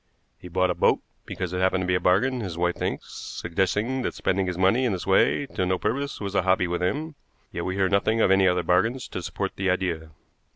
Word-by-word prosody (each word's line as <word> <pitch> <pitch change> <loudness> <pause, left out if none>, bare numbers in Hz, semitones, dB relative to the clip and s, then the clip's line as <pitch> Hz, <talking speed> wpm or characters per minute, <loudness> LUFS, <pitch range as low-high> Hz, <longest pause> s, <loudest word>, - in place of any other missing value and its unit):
He - - -10
bought 90 +1 +1
a - - +1
boat - - +3 0.3
because 90 -1 -4
it 90 - -1
happened 95 0 +2
to - - -3
be 90 - +1
a 90 - +2
bargain, 105 +9 +2
his 95 -7 -5
wife 90 0 +1
thinks, - - -4
suggesting 100 +9 -2
that - - -3
spending 95 0 0
his 90 -1 -3
money 95 +8 +3
in 120 -5 +1
this 90 - -4
way 95 +8 +3
to 95 - -3
no 90 0 +1
purpose 140 +8 -2
was 100 -1 -4
a 95 - +3
hobby 95 0 +2
with 90 +1 -2
him; 150 - -1 0.4
yet - - -4
we 95 - -2
hear 95 -1 +2
nothing 100 +4 +1
of 95 - +4
any 95 0 +5
other 90 -1 +2
bargains 110 +10 +1
to - - -5
support - - -4
the 95 0 0
idea. 85 -4 -1
95 Hz, 240 wpm, -25 LUFS, 90-105 Hz, 0.4 s, any